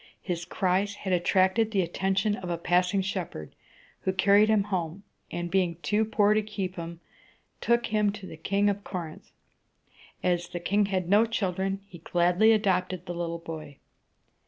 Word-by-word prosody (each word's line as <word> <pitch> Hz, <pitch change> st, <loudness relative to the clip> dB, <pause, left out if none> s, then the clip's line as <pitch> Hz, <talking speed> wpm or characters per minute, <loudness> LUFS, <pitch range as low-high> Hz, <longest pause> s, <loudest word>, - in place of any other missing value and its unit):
His 175 Hz, -2 st, -3 dB
cries 195 Hz, +3 st, 0 dB
had 190 Hz, -2 st, -3 dB
attracted 190 Hz, +5 st, +3 dB
the 200 Hz, -4 st, +1 dB
attention 195 Hz, +4 st, 0 dB
of 185 Hz, -3 st, -7 dB
a 170 Hz, -, -1 dB
passing 180 Hz, +3 st, +2 dB
shepherd, 180 Hz, -, -5 dB, 0.5 s
who 190 Hz, -, -1 dB
carried 200 Hz, +3 st, +4 dB
him 215 Hz, -2 st, +4 dB
home, 185 Hz, -2 st, -3 dB, 0.3 s
and, 175 Hz, 0 st, -4 dB
being 180 Hz, -3 st, +1 dB
too 215 Hz, +1 st, +2 dB
poor 210 Hz, -1 st, +3 dB
to 215 Hz, -, +2 dB
keep 200 Hz, -3 st, -4 dB
him, 170 Hz, -1 st, -7 dB, 0.6 s
took 235 Hz, 0 st, +2 dB
him 210 Hz, -2 st, +1 dB
to 205 Hz, -2 st, -9 dB
the 170 Hz, -, -9 dB
King 200 Hz, +6 st, 0 dB
of 205 Hz, 0 st, 0 dB
Corinth. 170 Hz, -5 st, -7 dB, 0.9 s
As 175 Hz, -1 st, +1 dB
the 175 Hz, -, -5 dB
king 200 Hz, +3 st, +1 dB
had 185 Hz, -3 st, -1 dB
no 210 Hz, +5 st, +5 dB
children, 195 Hz, -3 st, -1 dB
he 180 Hz, -4 st, -13 dB
gladly 175 Hz, +6 st, +3 dB
adopted 185 Hz, -4 st, +1 dB
the 175 Hz, -, -4 dB
little 170 Hz, -1 st, -3 dB
boy. 160 Hz, -4 st, -8 dB
190 Hz, 165 wpm, -27 LUFS, 175-205 Hz, 0.9 s, no